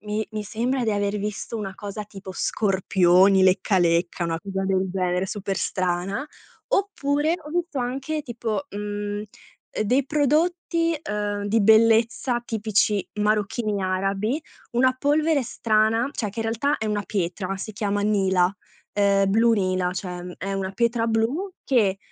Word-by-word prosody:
mi 210 +1 -3
mi 215 - -3
sembra 240 +5 -1
di 225 - +1
aver 205 0 0
visto 210 +3 -4
una 200 -3 -4
cosa 205 +1 -6
tipo 195 -2 -10
scorpioni, 190 -1 +3
lecca 190 +1 +3
lecca, 170 0 +1
una 165 -1 -2
cosa 195 0 -3
del 190 0 +1
genere 180 0 0
super 195 0 -3
strana. 185 +7 -1 0.4
Oppure, 310 -6 +1
ho 300 - -11
visto 340 -3 -2
anche 270 +5 -2
tipo, 225 -6 -3
mhmm, 205 0 -4
uhm, - - -7 0.6
dei 255 +5 +2
prodotti, 330 +3 +1
uhm, 205 -1 -2
di 220 +2 +2
bellezza 230 +3 +4
tipici 215 -2 +1
marocchini 210 0 0
arabi, 195 +8 -1 0.3
una 255 +2 +3
polvere 300 +1 +2
strana, 225 +1 +1
cioè 215 - -2
che 225 +3 -5
in 225 - -2
realtà 235 +6 0
è 220 - -3
una 210 -1 -1
pietra, 190 0 -2
si 215 +3 -6
chiama 205 0 -1
nila, 190 -3 +2 0.4
ehm, 200 -1 +3
blu 230 +3 +4
nila, 185 -3 +1
cioè 180 -1 -5
è 195 +2 -3
una 195 -1 -2
pietra 235 +2 +1
blu 230 - 0
che, 210 -7 +2
210 Hz, 150 wpm, -24 LUFS, 195-240 Hz, 0.6 s, bellezza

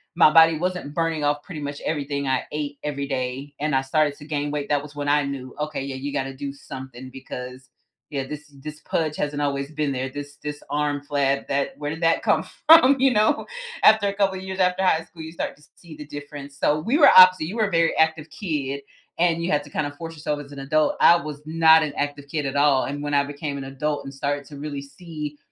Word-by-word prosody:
my 170 - +7
body 165 -1 +7
wasn't 180 -3 -3
burning 165 -2 -1
off 145 0 +1
pretty 160 -4 -8
much 145 0 -5
everything 140 -2 -2
I 130 -1 +1
ate 145 -1 -4
every 140 -1 -3
day, 135 +1 -4
and 150 0 0
I 135 - +3
started 145 +1 +1
to 145 - -12
gain 145 -1 -2
weight, 145 -1 -3
that 145 -1 +1
was 150 -1 -11
when 145 0 -4
I 145 0 +3
knew, 135 -2 -6
"Okay, 150 -2 -3
yeah, 135 -1 -5
you 140 +2 -5
gotta 135 -1 -2
do 140 +1 -5
something 130 -2 -9
because 130 0 -9 0.4
yeah, 140 -3 -3
this 150 0 -8 0.2
this 150 0 -8
pudge 155 -1 -1
hasn't 145 0 -2
always 140 0 -2
been 150 -2 -1
there, 130 +1 -3
this 145 +1 -8
this 150 0 -5
arm 145 -1 -1
flab 140 -1 +1
that 140 0 -1
where 145 0 -4
did 160 +2 -6
that 165 0 +3
come - - +2 0.2
from?" 310 -4 +8
You 270 -1 +4
know? 215 0 +2 0.4
After 215 -1 +6
a - - -3
couple 195 -2 +1
years 190 0 -6
after 180 +1 +2
high 165 -3 +2
school, 165 -2 -13
you 160 - -8
start 170 - -4
to - - -23
s 150 - -22
see 170 -3 -13
the 150 - -8
difference, 145 -1 -9
so, 150 +1 +2
we 235 - +1
were 310 - +8
opposite, 185 -3 +8
you 195 - -6
were 215 -2 +2
a - - -11
very 165 0 +2
active 160 -1 +1
kid, 140 -7 -3 0.4
and 170 -1 +2
you 175 - -1
had 150 -1 +1
to 145 - -14
kind 150 - -2
of 145 - -9
force 165 0 -7
yourself 150 -1 -3
as 140 - -16
an 140 - -8
adult, 150 +3 +1
I 170 - +8
was 150 -2 -7
not 160 0 +5
an 145 -2 -3
active 145 0 -3
kid 150 0 -3
at 135 +1 -3
all, 140 -2 +4
and 145 +1 -4
when 145 0 -3
I 140 0 +4
became 145 0 -5
an 135 - -6
adult 145 +2 -3
and 135 - -8
started 145 +1 -2
to 145 - -10
really 145 -1 -5
see 150 +1 -8
145 Hz, 245 wpm, -23 LUFS, 140-160 Hz, 0.4 s, from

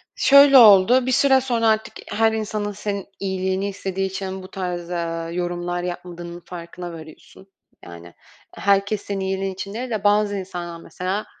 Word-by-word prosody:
Şöyle 280 0 +7
oldu. 230 +3 +7
Bir 260 - 0
süre 265 +1 +4
sonra 235 -3 0
artık 220 0 +1 0.2
her 225 +1 +3
insanın 215 -1 -3
senin 200 -1 -4
iyiliğini 190 0 -2
istediği 195 -1 -3
için 190 0 -6
bu - - -9
tarz, 175 -2 -4
eee, 165 -1 -4
yorumlar 175 0 -3
yapmadığının 175 -1 -7
farkına 175 0 -8
variyorsun. 160 +4 -13 0.4
Yani, 85 0 -12 0.4
herkes 200 +1 +1
senin 200 -1 -4
iyiliğin 190 0 -2
için 195 +2 -7
değil 245 +3 -5
de 215 -4 -3
bazı 205 0 +2
insanlar, 175 -3 -6
mesela, 190 +4 -4
190 Hz, 155 wpm, -22 LUFS, 175-210 Hz, 0.4 s, Şöyle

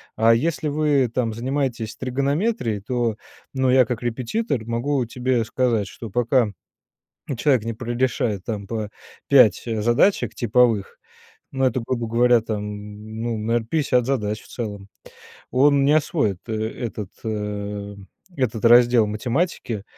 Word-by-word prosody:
А 115 +1 +5
если 150 +3 0
вы 145 -4 +2
там 115 -3 0
занимаетесь 125 -2 -2
тригонометрией, 140 - -1
то, 120 -1 -1 0.4
ну, 130 -1 +1
я 130 0 +5
как 120 -1 -4
репетитор 125 - -2
могу 120 +3 -1
тебе 125 0 0
сказать, 115 -3 0
что 115 - -9
пока 120 +1 +2 0.9
человек 130 -2 +2
не 115 -1 -3
прорешает 120 -4 -1
там 105 -3 -4
по 110 -1 -4 0.4
5 125 -8 +6
задачек 120 - +2
типовых, 120 -3 +2 0.6
ну 135 0 0
это, 130 -1 +1
грубо 120 -3 -2
говоря, 120 +1 +4
там, 110 -2 -3 0.6
ну, 115 -1 -2
наверно, 115 +1 -1
50 130 -6 +1
задач 105 -6 -1
в - - -18
целом, 105 -4 -6 0.6
он 140 +2 +4
не 145 - +4
освоит 145 - 0
этот, 110 -2 -4 0.2
э, 105 -1 -4 0.4
этот 120 -5 -1
раздел 120 -1 +6
математики. 115 - -2
120 Hz, 130 wpm, -22 LUFS, 110-130 Hz, 0.9 s, 5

